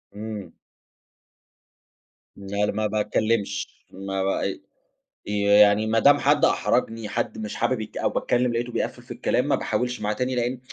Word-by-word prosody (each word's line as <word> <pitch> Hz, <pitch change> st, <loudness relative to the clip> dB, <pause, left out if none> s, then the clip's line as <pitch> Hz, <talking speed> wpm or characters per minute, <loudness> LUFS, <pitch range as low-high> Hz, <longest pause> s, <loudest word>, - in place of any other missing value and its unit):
إمم. 105 Hz, -1 st, -6 dB, 1.8 s
لا 100 Hz, +1 st, -2 dB
ل -, -, -1 dB
ما 110 Hz, 0 st, 0 dB
باتكلمش، 105 Hz, -1 st, 0 dB, 0.2 s
ما 95 Hz, 0 st, -3 dB
ب 95 Hz, -, -1 dB, 0.7 s
ي 105 Hz, 0 st, -1 dB
يعني 105 Hz, +1 st, +5 dB
ما 115 Hz, +1 st, +2 dB
دام 145 Hz, +5 st, +6 dB
حد 145 Hz, +1 st, +3 dB
أحرجني، 115 Hz, -3 st, 0 dB
حد 105 Hz, -, -2 dB
مش 110 Hz, -1 st, -5 dB
حابب 120 Hz, 0 st, 0 dB
يت 110 Hz, -, -8 dB
أو -, -, +1 dB
باتكلم 125 Hz, 0 st, 0 dB
لقيته 120 Hz, +1 st, -2 dB
بيقفل -, -, -3 dB
في -, -, -13 dB
الكلام -, -, 0 dB
ما -, -, +3 dB
باحاولش 125 Hz, -1 st, -2 dB
معاه 105 Hz, 0 st, 0 dB
تاني، 125 Hz, +3 st, -2 dB
لإن 125 Hz, +1 st, -1 dB
110 Hz, 155 wpm, -24 LUFS, 105-120 Hz, 1.8 s, دام